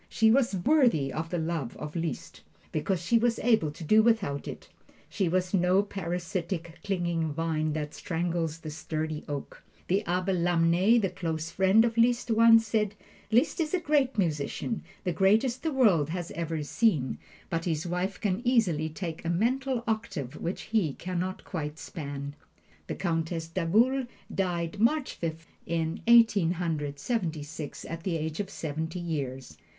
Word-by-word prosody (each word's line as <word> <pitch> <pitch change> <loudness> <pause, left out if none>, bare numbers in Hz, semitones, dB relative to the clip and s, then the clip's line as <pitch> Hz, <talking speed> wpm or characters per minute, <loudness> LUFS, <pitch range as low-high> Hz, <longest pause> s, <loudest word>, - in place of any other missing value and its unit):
She 220 -1 +4
was 240 -4 +3
worthy 185 - +3
of 160 +3 -3
the 175 - -1
love 160 -6 -3
of 150 +1 -7
Liszt, 165 -1 -4 0.3
because 185 -4 -1
she 230 +4 +4
was 235 0 +2
able 220 -10 +3
to 150 +3 -9
do 215 +8 +5
without 215 -11 +1
it. - - -7 0.4
She 190 -5 0
was 185 +1 0
no 185 +1 +4
parasitic, 175 -2 -4
clinging 170 -5 -1
vine 155 0 -1
that 150 -1 -3
strangles 165 -2 -2
the 155 -2 -7
sturdy 155 0 -4
oak. 145 -1 -5 0.3
The 195 +4 +2
Abbe 180 +2 +1
Lamennais, 175 +5 +3
the 195 -4 0
close 160 -1 -3
friend 190 +5 +4
of 230 0 -1
Liszt, 235 0 +3
once 225 0 +6
said, 210 -1 0 0.3
"Liszt 240 +11 +2
is 320 +2 +1
a - - +1
great 285 -6 +1
musician, 165 - -1 0.2
the 180 - -1
greatest 220 +8 +3
the 320 - -1
world 200 - +4
has 175 0 -4
ever 165 -2 -3
seen, 145 - +1 0.3
but 165 -1 -1
his 160 -2 -1
wife 180 +2 -2
can 200 0 0
easily 195 - +2
take 165 0 -6
a 165 - -2
mental 245 +7 0
octave 200 - -2
which 175 - -3
he 205 -10 0
can 180 0 -4
not 185 +1 -3
quite 150 -4 -4
span." 140 -3 -6 0.5
The - - -3
Countess 165 -2 -2
d'Agoult 220 +10 +2 0.3
died 175 -1 -1
March 265 +6 +2
Fifth, 165 0 -5 0.2
in 165 -1 -1
Eighteen 225 -7 +6
Hundred 155 -5 -2
Seventy 165 - -2
six, 150 -1 -7
at 165 0 -6
the 170 -1 -1
age 155 0 -4
of 200 -2 -2
seventy 160 0 -4
years. 135 - -4
175 Hz, 165 wpm, -28 LUFS, 160-215 Hz, 0.5 s, once